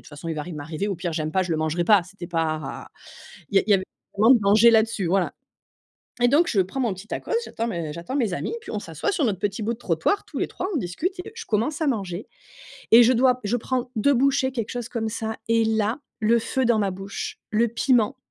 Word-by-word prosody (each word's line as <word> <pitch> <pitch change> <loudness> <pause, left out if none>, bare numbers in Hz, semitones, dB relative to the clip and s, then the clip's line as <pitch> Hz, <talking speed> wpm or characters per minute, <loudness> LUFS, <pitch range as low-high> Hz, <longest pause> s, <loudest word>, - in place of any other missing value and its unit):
toute - - -14
façon, 150 +3 -8
il 160 - -2
va 150 - -3
rien 175 +2 -7
m'arriver, 155 +6 -4
au 200 - -1
pire, 175 -1 -4
j'aime 155 -1 -2
pas, 190 - +2
je 180 - -5
le 160 - +1
mangerai 160 +2 0
pas». 205 -1 +5
C'était 180 0 -10
pas. 160 -4 -3 0.6
Il - - -6
y - - +8
a - - -1
il - - -7
y - - +7
avait 190 -1 +3
pas 195 - -10
vraiment 235 +4 +8
de - - +2
danger 210 +4 +6
là-dessus. 220 -3 +2
Voilà. 185 +1 +1 0.9
Et 245 - +6
donc, 300 +7 +4
je 200 - +3
prends 190 +9 -4
mon 235 -6 +1
petit 190 +3 -11
tacos, - - -5
j'attends 230 - -3
mes 170 -8 -4
j'attends 170 - -6
mes 230 -9 0
amis, 315 - -3
puis - - -9
on - - -2
s'assoit 410 - -3
sur 355 -6 0
notre 200 -6 -1
petit 205 +2 -2
bout 230 +3 0
de - - -9
trottoir, 190 - 0
tous - - -6
les - - 0
3, - - -4
on - - +1
discute 255 - -2
et - - -10
je 455 - -7
commence 240 - -1
à 310 - +1
manger 200 -7 -2 0.6
et 235 +2 +9
je 240 +2 +5
dois 255 +1 +3
je 220 +4 +1
prends 250 +1 -2
2 280 +7 +3
bouchées, 270 +1 +2
quelque 230 -4 -3
chose 245 -1 -4
comme 230 -3 -2
ça, 220 0 -4
et 230 0 +3
là, 220 +2 0 0.2
le 225 +2 +4
feu 260 +3 -1
dans 235 -2 +3
ma 200 -2 +1
bouche, 195 +2 -6
le 230 +2 +2
piment 240 +1 +2
215 Hz, 260 wpm, -24 LUFS, 180-245 Hz, 0.9 s, et